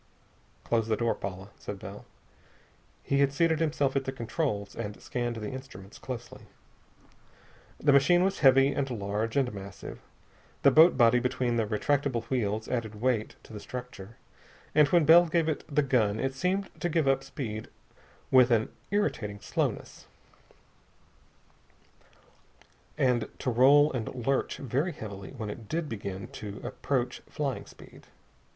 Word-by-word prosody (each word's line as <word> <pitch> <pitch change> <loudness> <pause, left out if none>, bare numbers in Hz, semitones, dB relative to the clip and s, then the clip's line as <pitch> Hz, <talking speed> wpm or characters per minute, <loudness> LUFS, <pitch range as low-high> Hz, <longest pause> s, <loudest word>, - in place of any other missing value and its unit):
"Close 115 -2 0
the 110 - +2
door, 115 -1 +1
Paula," 95 0 -7
said 105 - -6
Bell. 100 +1 -9 1.0
He 140 - +1
had 140 -1 +4
seated 160 +2 +2
himself 145 -4 0
at 135 -1 0
the 130 - -2
controls, 115 -5 -3
and 105 -3 -5
scanned 120 -3 -3
the 105 -2 -5
instruments 130 -8 -10
closely. 120 -2 -7 1.4
This 145 -1 +4
machine 160 +6 +5
was 195 +1 0
heavy 135 -1 +6
and 140 -1 -1
large 110 +1 -2
and 130 -4 +1
massive. 100 -1 -8 0.6
The - - +7
boat 160 0 +7
body 120 -1 +5
between 125 -1 -1
the 115 -2 0
retractable 130 +2 0
wheels 110 -3 -1
added 110 -4 -3
weight 120 -2 0
to - - -14
the 105 - -6
structure, 120 -3 -8 0.6
and 150 -1 +6
when 170 0 +3
Bell 170 +3 +7
gave 165 0 +1
it 155 - -1
the 150 -1 +1
gun 110 -6 +1
it 135 0 -1
seemed 185 +7 -1
to 175 - 0
pick 160 -2 +1
up 135 0 +2
speed 110 -5 -6 0.6
with 130 -1 +6
an 110 -2 +2 0.2
irritating 115 - -1
slowness, - - -3 2.9
and 125 -5 +1
to 130 - -2
roll 140 +5 +5
and 120 0 -4
lurch 135 0 0
very 140 +7 -1
heavily 100 -6 -8
when 110 -3 -4
it 110 0 -10
did 165 -1 -2
begin 100 -5 -5
to 105 -1 -8
approach 125 -3 -2
flying 140 -4 -3
speed. - - -15
125 Hz, 145 wpm, -29 LUFS, 110-140 Hz, 2.9 s, The